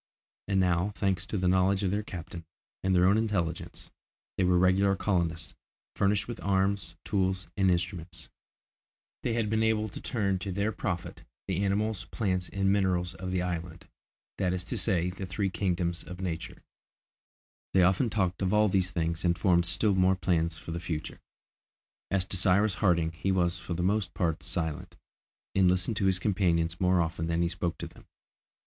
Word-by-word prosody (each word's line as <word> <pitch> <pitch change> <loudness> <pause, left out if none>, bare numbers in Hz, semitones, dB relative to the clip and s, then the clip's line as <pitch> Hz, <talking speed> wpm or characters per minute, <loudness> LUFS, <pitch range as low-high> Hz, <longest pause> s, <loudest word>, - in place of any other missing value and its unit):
And 95 -1 +2
now, 90 +2 +1
thanks 95 -2 -1
to 105 - -2
the 90 -1 +1
knowledge 95 +2 +3
of 95 - +1
their 100 +1 0
captain, 85 -4 -8 0.4
and 95 0 +1
their 90 0 +5
own 100 +4 +4
intelligence, 95 -7 -3 0.4
they 95 - +1
were 90 0 +4
regular 95 +2 +4
colonists, 90 -4 -1 0.4
furnished 100 0 +1
with 120 -1 -6
arms, 100 +1 0
tools, 95 -2 0
and 95 -2 +3
instruments; 85 -1 -3 0.9
they 120 - -1
had 115 -2 0
been 110 +1 +1
able 110 -1 +1
to - - -9
turn 100 -5 -1
to 95 +1 -4
their 100 +4 0
profit 95 -5 -4 0.3
the 95 0 0
animals, 105 +1 0
plants, 95 -4 -2
and 95 -1 +1
minerals 90 -3 +1
of 90 +2 -6
the 90 -1 0
island, 85 0 -5 0.5
that 90 -1 +1
is 90 -1 -2
to - - -4
say, 90 -4 +1
the 95 +1 -6
three 95 +1 -1
kingdoms 85 -3 -1
of 90 0 -9
Nature. 90 -4 -4
Yes; - - -24 1.1
they 95 - +6
often 95 +7 +3
talked 95 -4 -1
of 95 -1 +1
all 105 0 +4
these 95 -1 +1
things 85 -2 -2
and 85 -1 +2
formed 85 -1 +3
still 100 +5 +2
more 95 0 +3
plans 85 -3 0
for 80 - -8
the 85 - -3
future. 85 -3 -5 0.9
As 95 -2 +1
to 95 - -2
Cyrus 100 +3 +3
Harding 85 -5 +3
he 85 +4 -2
was 90 -1 +1
for 90 - -5
the 85 - -2
most 100 +2 0
part 85 -2 0
silent, 80 -4 -3 0.6
and 95 -2 +4
listened 90 +4 0
to 100 - +1
his 95 -1 +3
companions 85 -4 0
more 90 -1 +4
often 80 0 -2
than 85 +1 +1
he - - +2
spoke 85 0 -2
to - - -5
them. - - -18
95 Hz, 185 wpm, -29 LUFS, 85-100 Hz, 1.1 s, they